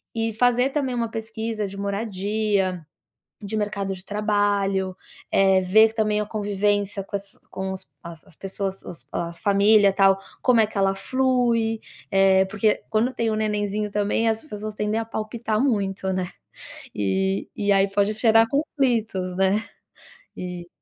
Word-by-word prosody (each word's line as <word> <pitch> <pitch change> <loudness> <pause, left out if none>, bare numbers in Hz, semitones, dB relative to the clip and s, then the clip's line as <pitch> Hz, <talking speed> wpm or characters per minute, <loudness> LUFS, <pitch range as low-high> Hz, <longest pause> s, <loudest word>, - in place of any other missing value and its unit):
E 225 -1 -1
fazer 245 +3 +3
também 265 -4 -1
uma 230 -1 -1
pesquisa 220 -1 -4
de 195 +1 -9
moradia, 200 -2 -1 0.7
de 220 - -3
mercado 200 -2 -2
de 185 - -10
trabalho, 200 -2 0 0.4
eh, 190 -1 +4
ver 220 +4 +5
também 215 -1 +1
a - - -2
convivência 205 -1 -1
com 200 - -6
essa 200 0 -7
com 190 0 -4
os 190 - -8 0.2
as 170 -1 -10
as 160 - -19
pessoas 195 0 -4
os 140 -8 -10
as 170 0 -4
família, 200 +1 +4
tal, 195 -1 +4 0.2
como 245 -3 +4
é - - +4
que 215 - -8
ela 195 0 +2
flui, 240 -1 +1 0.3
eh, 190 0 +5
porque 210 +2 0
quando 225 +4 +1
tem 230 -2 -1
o 215 - 0
nenenzinho 210 -1 -1
também, 205 +2 0
as 225 +3 -2
pessoas 215 -6 -6
tendem 210 +1 -1
a 225 - -3
palpitar 220 0 -3
muito, 195 -2 -2
né, 185 -1 -1 0.7
e 95 0 0 0.2
e 205 - +2
aí 195 0 +4
pode 200 +1 +3
gerar 225 +1 +4
conflitos, 245 -10 0
né, 190 0 +3 0.9
e 180 -1 -6
205 Hz, 155 wpm, -24 LUFS, 195-220 Hz, 0.9 s, ver